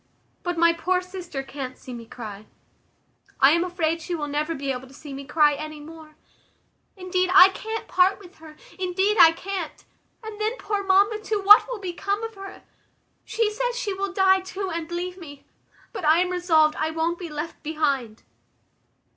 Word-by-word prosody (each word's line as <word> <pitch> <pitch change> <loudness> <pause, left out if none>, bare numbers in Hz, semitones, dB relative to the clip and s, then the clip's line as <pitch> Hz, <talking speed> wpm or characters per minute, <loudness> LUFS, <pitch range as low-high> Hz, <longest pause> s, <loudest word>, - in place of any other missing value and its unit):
But 350 -1 -3
my 335 0 +5
poor 360 +2 0
sister 360 -6 -7
can't 270 -2 -7
see 255 - -10
me 230 -1 -9
cry. 215 -3 -9 0.9
I 270 +1 +7
am 340 +2 +3
afraid 335 -2 -1
she 345 +2 -4
will 300 -3 -3
never 300 +3 -2
be 275 -1 -3
able 260 0 -6
to 270 - -17
see 290 -1 -10
me 275 +1 -7
cry 300 +1 +3
any 310 +1 -7
more. 310 0 -13 0.8
Indeed, 370 0 -1
I 380 -1 +10
can't 440 +3 -6
part 370 +2 +3
with 385 -2 -16
her; 310 -1 -14 0.2
indeed, 380 +3 0
I 330 -2 +9
can't. 365 0 -6 0.4
And 435 -1 -8
then 440 +4 -1
poor 410 -3 -3
mamma 400 +3 +3
too, 430 0 -2
what 405 +2 +7
will - - -4
become 400 +2 -3
of 450 0 -5
her? 390 -1 -11 0.6
She 450 -2 0
says 485 +2 -2
she 430 -5 -2
will 390 0 -3
die 380 0 +4
too, 380 +1 -5
and 330 -1 -4
leave 360 +2 -4
me: 285 -5 -12 0.5
but - - -6
I 310 +1 +5
am 365 0 -1
resolved 325 -4 +3
I 310 - -1
won't 325 +2 -2
be 350 -3 -6
left 300 +2 -6
behind." 280 -8 -2
345 Hz, 185 wpm, -24 LUFS, 305-390 Hz, 0.9 s, I